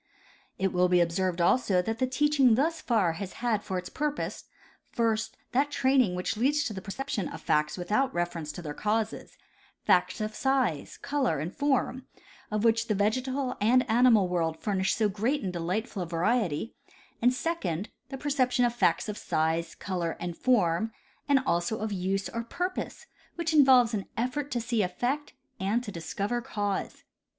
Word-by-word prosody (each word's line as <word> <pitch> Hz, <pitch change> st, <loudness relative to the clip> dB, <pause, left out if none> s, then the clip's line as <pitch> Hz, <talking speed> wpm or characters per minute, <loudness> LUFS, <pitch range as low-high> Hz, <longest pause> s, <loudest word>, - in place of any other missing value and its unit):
It 195 Hz, -1 st, 0 dB
will 180 Hz, 0 st, +3 dB
be 180 Hz, 0 st, +4 dB
observed 175 Hz, +1 st, +1 dB
also 190 Hz, 0 st, +3 dB
that 225 Hz, +4 st, -3 dB
the 255 Hz, -, +2 dB
teaching 270 Hz, -2 st, +4 dB
thus 320 Hz, +6 st, 0 dB
far 205 Hz, -9 st, +2 dB
has 190 Hz, -2 st, -5 dB
had 230 Hz, -4 st, -1 dB
for 190 Hz, -, -3 dB
its 180 Hz, 0 st, -4 dB
purpose, 295 Hz, 0 st, -3 dB, 0.4 s
first, 225 Hz, -2 st, -1 dB
that 275 Hz, +3 st, +2 dB
training 260 Hz, -8 st, +2 dB
which 180 Hz, -, -2 dB
leads 285 Hz, +6 st, +2 dB
to 220 Hz, -, -3 dB
the 190 Hz, -, -6 dB
perception 200 Hz, -2 st, -3 dB
of -, -, -7 dB
facts 150 Hz, +1 st, +1 dB
without 210 Hz, +10 st, +1 dB
reference 170 Hz, -3 st, -2 dB
to 175 Hz, -, -8 dB
their 150 Hz, -2 st, -5 dB
causes— 215 Hz, +5 st, -2 dB, 0.5 s
facts -, -, +3 dB
of 215 Hz, 0 st, -3 dB
size, 260 Hz, -, 0 dB
color 280 Hz, -, 0 dB
and 155 Hz, +6 st, -4 dB
form, 270 Hz, -2 st, 0 dB, 0.4 s
of 215 Hz, 0 st, -1 dB
which 230 Hz, 0 st, +3 dB
the 215 Hz, -, +1 dB
vegetal 255 Hz, +6 st, 0 dB
and 250 Hz, +4 st, +4 dB
animal 225 Hz, -4 st, +5 dB
world 165 Hz, -2 st, -1 dB
furnish 190 Hz, 0 st, 0 dB
so 220 Hz, -2 st, +2 dB
great 220 Hz, +8 st, -1 dB
and 185 Hz, -2 st, -3 dB
so 175 Hz, -, -3 dB
delightful 190 Hz, +4 st, -2 dB
a 175 Hz, -, -3 dB
variety, 180 Hz, +2 st, 0 dB, 0.2 s
— -, -, -29 dB
and 245 Hz, +2 st, +5 dB
second, 220 Hz, -, -2 dB, 0.2 s
the 270 Hz, -, -5 dB
perception 260 Hz, -3 st, +1 dB
of 240 Hz, -, +1 dB
facts 240 Hz, -, +2 dB
of 210 Hz, -1 st, -4 dB
size, 160 Hz, +1 st, -1 dB
color 175 Hz, -4 st, -3 dB
and 175 Hz, -1 st, -4 dB
form, 220 Hz, -3 st, +2 dB, 0.4 s
and 275 Hz, -2 st, +5 dB
also 175 Hz, +2 st, 0 dB
of 220 Hz, 0 st, -3 dB
use 195 Hz, +1 st, -1 dB
or 230 Hz, 0 st, -4 dB
purpose, 360 Hz, +10 st, -4 dB, 0.3 s
which 335 Hz, -1 st, -1 dB
involves 260 Hz, -5 st, +6 dB
an 200 Hz, -3 st, -2 dB
effort 255 Hz, +5 st, -1 dB
to 245 Hz, -, -1 dB
see 230 Hz, -1 st, 0 dB
effect 245 Hz, +11 st, -2 dB, 0.3 s
and 205 Hz, +6 st, 0 dB
to 210 Hz, -, -6 dB
discover 200 Hz, +7 st, -3 dB
cause. 205 Hz, -5 st, -3 dB
220 Hz, 175 wpm, -28 LUFS, 180-255 Hz, 0.5 s, involves